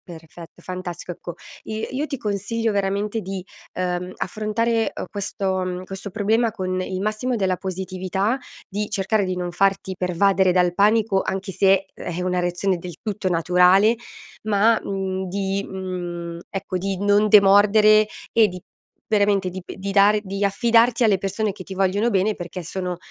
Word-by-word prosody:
Perfetto, 165 +1 -13
fantastico 180 -1 -6
ecco. 175 0 -8 0.3
I 220 0 -4
io 285 +4 -2
ti 280 - -3
consiglio 220 +1 -1
veramente 200 +2 -1
di, 190 -1 -6 0.3
ehm, 180 0 -3
affrontare, 225 +3 -1
uhm, - - -4
questo 195 -2 -2
mhmm, 180 0 -4
questo 195 +1 -7
problema 220 +3 +1
con 185 -3 -3
il 185 0 -3
massimo 215 +4 -1
della 190 -4 0
positività, 190 +4 -2 0.3
di 205 +2 -3
cercare 200 +1 0
di 185 0 -2
non 180 -1 -3
farti 190 +1 0
pervadere 185 +1 +2
dal 180 -1 +3
panico, 205 0 +3
anche 190 +1 -3
se 195 0 +3
è 175 +1 -5
una 180 0 0
reazione 180 +2 0
del 175 -1 -8
tutto 210 -3 -3
naturale, 180 +5 +4 0.5
ma, 215 +1 +3
mhmm, 190 -1 -3
di 195 +1 -2
mhmm, 175 -3 -5
ecco, 195 -1 -4
di 195 +1 -2
non 205 +1 +4
demordere 210 +1 +6 0.2
e 225 -2 +5
di 180 -2 -8 0.5
veramente 200 -3 +2
di 185 +1 -7
p - - -9
di 195 +1 -4
dare 205 +1 +5
di 195 0 -4
affidarti 235 +3 +3
alle 205 -3 +4
persone 200 +2 -2
che 185 - -10
ti 190 - -8
vogliono 195 +4 +1
bene, 200 +1 +1
perché 175 +1 -6
sono 180 +1 -4
195 Hz, 160 wpm, -22 LUFS, 185-210 Hz, 0.5 s, demordere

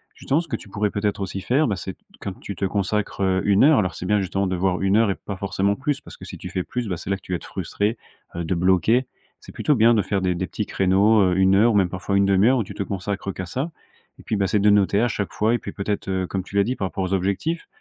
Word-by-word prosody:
justement, 140 - 0
ce 170 - -10
que 115 - -2
tu 100 - -10
pourrais 105 0 -1
peut-être 105 0 -1
aussi 95 0 -4
faire, 135 +8 +2
bah, 105 - 0
c'est 95 0 -6
t - - -28 0.2
quand 100 - -4
tu 100 - -7
te - - -6
consacres, 100 +1 -1
heu, 95 -1 +2
une 100 -1 +4
heure 150 -5 +6
alors 90 -3 -1
c'est 90 - -6
bien, 105 +2 +2
justement, 95 +1 -1
de 90 - -1
voir 90 +1 0
une 95 +1 +2
heure 115 -2 +4
et - - -2
pas 100 - -7
forcément 100 +1 0
plus, 140 +3 -2
parce - - -12
que, - - -13
si - - -8
tu - - -8
fais 95 -1 -2
plus, 125 +2 -4
bah, 90 - -2
c'est 85 - -8
là 100 - +2
que - - -23
tu 90 - -10
vas - - +1
être - - -13
frustré, 105 +3 -2 0.4
heu, 85 - -3
de 80 - -1
bloquer. 95 +8 +3 0.3
C'est - - -13
plutôt 150 - +1
bien 115 0 +5
de 105 - +3
faire 95 +1 -1
des 90 -1 0
des 95 +1 -2
petits 105 +5 -3
créneaux, 100 +3 +3
heu, 90 -1 +2
1 95 0 +4
heure 110 +3 +4
ou - - 0
même, 95 -3 +3
parfois, 95 +2 -3
1/2 100 +2 +4
heure 130 -1 +4
où - - +1
tu - - -9
te 100 - -2
consacres 100 0 -4
qu'à 95 - -5
ça. 135 - -3 0.5
Et - - -13
puis, 110 - -2
bah, 100 -1 +1
c'est 105 - +1
de 105 +1 +4
noter, 100 0 +3
à 120 - +3
chaque 100 -3 -3
fois. 110 +2 +1
Et - - +1
puis - - -7
peut-être, 100 0 -3
heu, 95 -1 -1
comme 95 0 -3
tu 100 - -11
l'as 100 - +5
dit, 125 +5 -2
par 95 - -3
rapport 95 - -4
aux 95 +1 -2
objectifs, 100 - -1
100 Hz, 305 wpm, -23 LUFS, 95-105 Hz, 0.5 s, heure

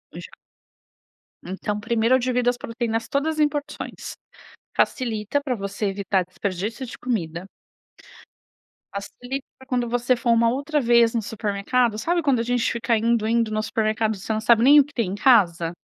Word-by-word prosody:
Já - - -8 1.2
Então, 205 +3 -4
primeiro 230 +3 +2
eu - - +3
divido 250 -1 +1
as 245 - -1
proteínas 230 -1 -3
todas 310 +3 -1
em 300 - +5
porções. 295 0 -6 0.6
Facilita 235 +1 0
pra 270 -3 -2
você 200 0 -4
evitar 195 -1 0
desperdício 200 +7 -4
de 235 - -9
comida 175 -8 -3 1.5
facilita 245 +7 -6
pra 265 - -16
quando 245 -3 -1
você 245 +1 +1
for 235 0 0
uma 230 0 +4
outra 285 +4 -1
vez 235 -2 +4
no 230 - 0
supermercado, 215 +2 -1
sabe 340 +10 0
quando 275 -5 +2
a - - 0
gente 245 0 0
fica 235 0 0
indo, 225 0 +1
indo 230 -1 +1
no 215 0 0
supermercado, 220 0 0
você 195 +3 -6
não 215 - -1
sabe 230 +1 +4
nem 285 +3 +8
o 285 - +6
que 290 - -18
tem 220 -7 -1
em - - -3
casa? 175 -9 +3
230 Hz, 170 wpm, -23 LUFS, 210-250 Hz, 1.5 s, nem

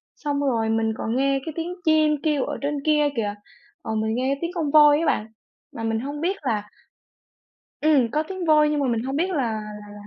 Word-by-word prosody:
xong 285 -1 -2
rồi 230 -6 0
mình 225 0 +1
còn 225 +2 -2
nghe 275 0 +2
cái 320 - -5
tiếng 340 +2 -4
chim 310 -1 +4
kêu 300 -4 +1
ở 290 - -4
trên 290 +1 -1
kia 300 -1 +3
kìa, 205 -3 -2 0.5
ờ, 220 - -4
mình 220 +1 -1
nghe 260 +2 0
có - - -16
tiếng 340 +1 -2
con 305 -4 -1
voi 295 -1 +7
á 330 - -1
bạn, 215 -6 0 0.5
mà 225 - -5
mình 225 0 0
hông 285 +4 -5
biết 375 +4 0
là 215 -6 -2 1.1
ừm, 280 -7 +3
có 305 +3 0
tiếng 375 -2 -5
voi 300 -1 +5
nhưng 300 -1 0
mà 275 - +1
mình 230 -1 0
hông 270 +1 -3
biết 355 +5 0
là 365 - -2
là 240 -4 0
là, 210 -1 -10
280 Hz, 235 wpm, -23 LUFS, 225-305 Hz, 1.1 s, voi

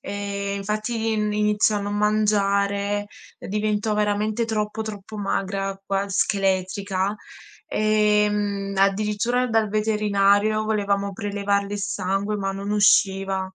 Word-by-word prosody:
ehm, 200 0 -4
infatti 215 +3 -2
ini 210 -1 0
iniziò 210 0 +2
a - - -1
non 205 0 -3
mangiare, 205 -1 +1 0.3
uhm, - - -9
diventò 210 +1 0
veramente 210 +2 0
troppo, 215 -1 -2
troppo 210 0 -8
magra, 195 0 -2
quas 195 0 -2
scheletrica. 195 0 0 0.5
Ehm, 210 -2 +1
addirittura 210 +5 +1
dal 225 -2 +1
veterinario 210 0 +2
volevamo 200 -2 0
prelevarle 200 -1 -1
il - - -4
sangue 195 +1 -1
ma 195 -1 -2
non 200 +1 -5
usciva. 195 -2 +3
205 Hz, 115 wpm, -23 LUFS, 200-210 Hz, 0.5 s, usciva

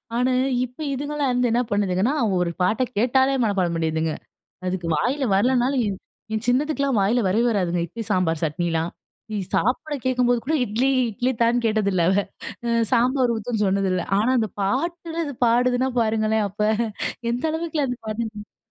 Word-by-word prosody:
ஆனா, 250 +2 +2 0.3
இப்ப 250 +3 -16
இதுங்கலாம் 285 0 -1
வந்து 245 0 +1
என்ன 240 +2 +2
பண்ணுதுகன்னா, 205 +2 +1
அவுங்க 215 -6 +1
ஒரு 170 - -2
பாட்ட 215 +7 +2
கேட்டாலே, 260 +4 +3
மனப்பாடம் 190 -6 +1
பண்ணிருதுங்க. 160 -1 0 0.6
அதுக்கு 180 -2 -2
வாயில 265 - 0
வரலனாலும் 250 +5 +2
என், 195 -2 -4 0.3
என் 220 +1 -2
சின்னதுக்கெல்லாம் 280 -1 +1
வாயில 225 +5 +2
வரவே 220 +6 +2
வராதுங்க. 180 -5 0
இட்லி, 225 +7 -7
சாம்பார், 165 -3 0
சட்னிலாம். 165 +1 -1 0.4
இ - - -1 0.2
சாப்பிட 280 +6 0
கேட்கும்போது 245 -2 +2
கூட 295 +7 -1
இட்லி 235 +4 0 0.2
இட்லி 245 +4 -1
தான்னு 235 +1 +2
கேட்டதில்லை, 200 -5 +1
அவ. - - +2 0.5
அ - - 0 0.2
சாம்பார் 250 +1 +3
ஊத்துன்னு 220 0 -2
சொன்னதில்ல. 190 -2 +1 0.2
ஆனா 215 +4 +2
அந்த 220 -2 0
பாட்டுல 330 - -2
அது 285 - -5
பாடுதுனா 245 +2 +2
பாருங்களேன்! 220 -1 +1
அப்ப 200 +2 -14 0.7
எந்த 245 +2 -3
அளவுக்குலாம் 315 -5 -1
பதிஞ்சிருக்கு. 215 -1 -5
230 Hz, 150 wpm, -23 LUFS, 195-255 Hz, 0.7 s, கேட்டாலே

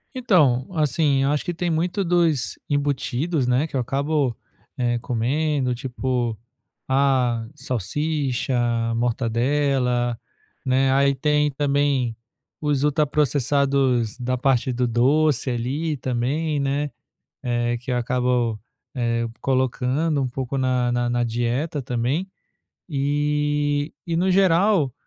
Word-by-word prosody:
Então, 150 - +3
assim, 145 -2 +2
acho 145 +1 +1
que 175 -1 -4
tem 175 0 -2
muito 175 +5 0
dos 170 -6 +1
embutidos, 145 +1 0
né, 125 +5 +2
que 160 - -17
eu 135 - +1
acabo, 140 0 0 0.4
eh, 120 -1 0
comendo, 130 +3 0
tipo, 125 -2 -2 0.5
ah, 130 -4 +2
salsicha, 135 - -2 0.4
mortadela, 120 +1 0 0.5
né. 130 +1 +3
Aí 140 0 +3
tem 150 +1 +1
também 140 -3 0 0.5
os 145 -2 0
ultraprocessados 140 -4 +1
da 125 0 -1
parte 130 0 +1
do 125 0 0
doce 135 +4 +2
ali 140 +7 -2
também, 140 +5 -1
né, 140 +1 -1 0.5
eh, 120 0 0
que 125 +2 -5
eu - - +1
acabo, 125 -2 0 0.4
eh, 115 -1 0
colocando 135 +3 0
um 130 - 0
pouco 130 +2 -4
na 125 -2 +1
na 120 0 0
na 120 0 0
dieta 120 +6 -1
também. 125 +8 -1 0.6
E 145 0 0
e 170 -2 -2
no 185 +3 +2
geral, 185 - +3
135 Hz, 115 wpm, -23 LUFS, 125-150 Hz, 0.6 s, Então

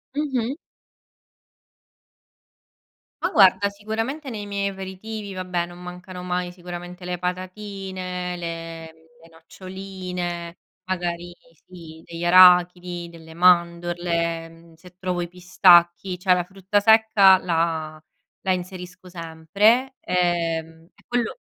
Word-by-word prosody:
Mh-mh. 270 -3 -1 2.7
Ma - - +1
guarda, 200 0 +5
sicuramente 225 +8 -4
nei 210 -3 -6
miei 200 0 -2
aperitivi, 195 +2 -7
vabbè, 180 -2 -2
non 175 0 -12
mancano 180 +1 -9
mai 180 0 -2
sicuramente 175 0 -9
le 180 0 -3
patatine, 185 0 -5
le 165 -1 -7 0.3
le - - -18
noccioline, 180 0 -7 0.3
magari, 175 -1 -3 0.3
sì, 165 -3 -13
degli 170 0 -7
arachidi, 180 -1 +5
delle 160 -1 -13
mandorle, 170 -1 +2
mhmm, 165 0 -18
se 180 +2 -17
trovo 180 -1 -2
i 175 - -3
pistacchi, 180 0 +4
cioè 185 0 +1
la 180 - 0
frutta 195 +2 -1
secca 215 -3 +6
la 160 -3 -1 0.4
la 190 - 0
inserisco 180 0 -5
sempre, 200 - +1
ehm, 165 -2 -1
e - - -25
quello 245 - -2
180 Hz, 110 wpm, -23 LUFS, 170-190 Hz, 2.7 s, secca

